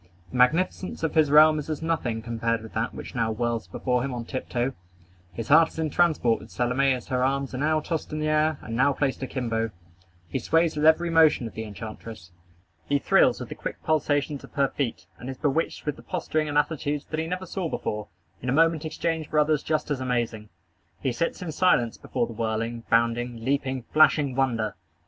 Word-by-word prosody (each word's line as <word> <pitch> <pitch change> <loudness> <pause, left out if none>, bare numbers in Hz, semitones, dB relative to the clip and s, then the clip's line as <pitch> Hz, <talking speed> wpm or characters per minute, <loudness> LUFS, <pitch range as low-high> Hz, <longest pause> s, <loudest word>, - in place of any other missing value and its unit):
The 130 - -4
magnificence 165 +8 +1
of 160 - 0
his 155 -3 +4
realm 155 +1 +7
is 150 - -7
as 155 0 -3
nothing 125 -9 -1
compared 115 -1 -1
with 110 - -11
that 110 +2 -2
which - - -8
now 115 -2 0
whirls 115 -2 -2
before 125 +7 -1
him 130 0 -3
on 120 -1 -5
tiptoe. 130 0 -2 0.6
His 110 +5 -6
heart 160 +2 +7
is - - -16
in 160 -2 -1
transport 155 -10 +2
with - - -13
Salome 125 +3 +1
as 125 0 -3
her 125 -1 +1
arms 135 0 0
are 130 - -3
now 155 +2 +2
tossed 160 0 -4
in 155 - -3
the 155 0 -1
air, 155 0 +2
and 115 - -5
now 135 +3 +3
placed 135 -1 -1
akimbo. 115 -4 -2 0.6
He 85 - -2
sways 165 0 +2
with 150 +1 +3
every 170 +2 +4
motion 160 -6 +5
of 115 - -7
the 110 - -5
enchantress. 110 -3 -9 0.6
He 145 - +3
thrills - - +3
with - - -7
the - - -4
quick - - -5
pulsations 145 -2 0
of - - -13
her 140 -1 +2
feet, 120 -9 -3
and 125 - -7
is 130 - -6
bewitched 150 +3 -1
with 150 -2 -2
the - - -12
posturing 155 -4 -2
and 145 - 0
attitudes 150 -1 0
that 155 - -1
he 160 - -2
never 180 +2 -3
saw 180 -1 -3
before, 105 -6 -3 0.3
in 125 - -3
a - - +2
moment 160 +2 +3
exchanged 160 0 -2
for 155 - -1
others 150 -1 +3
just 155 -1 -1
as 135 -3 -1
amazing. 120 -4 -2 0.5
He 130 - -1
sits 165 +8 -2
in 165 - -4
silence 145 -8 +2
before 125 -2 -1
the 115 - -8
whirling, 115 +1 -3
bounding, 115 0 +1
leaping, 130 -2 -1
flashing 150 -3 +5
wonder. 115 -6 0
135 Hz, 210 wpm, -26 LUFS, 120-155 Hz, 0.6 s, realm